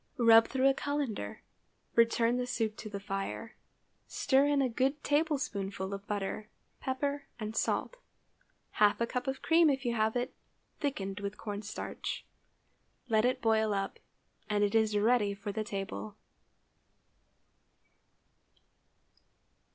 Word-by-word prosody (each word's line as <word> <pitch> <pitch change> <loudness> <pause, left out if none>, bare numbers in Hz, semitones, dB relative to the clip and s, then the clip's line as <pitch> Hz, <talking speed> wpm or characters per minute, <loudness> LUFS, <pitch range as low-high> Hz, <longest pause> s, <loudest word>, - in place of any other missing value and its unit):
Rub 225 -1 +7
through 265 0 +2
a 275 - +5
cullender, 275 - -3 0.5
return 230 +1 +3
the 250 0 -1
soup 225 -3 -1
to 215 - -7
the 200 -1 -5
fire, 195 +3 -4 0.5
stir 270 +1 +3
in 290 -1 +3
a 270 - +3
good 265 +5 0
tablespoonful 210 -11 0
of 200 0 -7
butter, 210 +1 -3 0.3
pepper, 280 +2 -2
and 215 0 -4
salt, - - 0 0.7
half 210 -1 +3
a 235 - +2
cup 250 +2 -3
of 265 0 -3
cream 330 -1 +5
if 270 -2 0
you 240 - +1
have 220 0 +1
it, 245 0 -1 0.5
thickened 195 -9 -2
with 200 +1 -4
corn 205 -2 -5
starch; 215 0 -5 0.8
let 220 0 +4
it 255 0 0
boil 220 -2 +3
up, 195 0 -3 0.5
and 205 0 +2
it 205 - +1
is 220 -2 +3
ready 210 -1 +3
for 205 +1 -5
the 215 +2 -2
table. 195 - -5
225 Hz, 135 wpm, -32 LUFS, 205-260 Hz, 0.8 s, Rub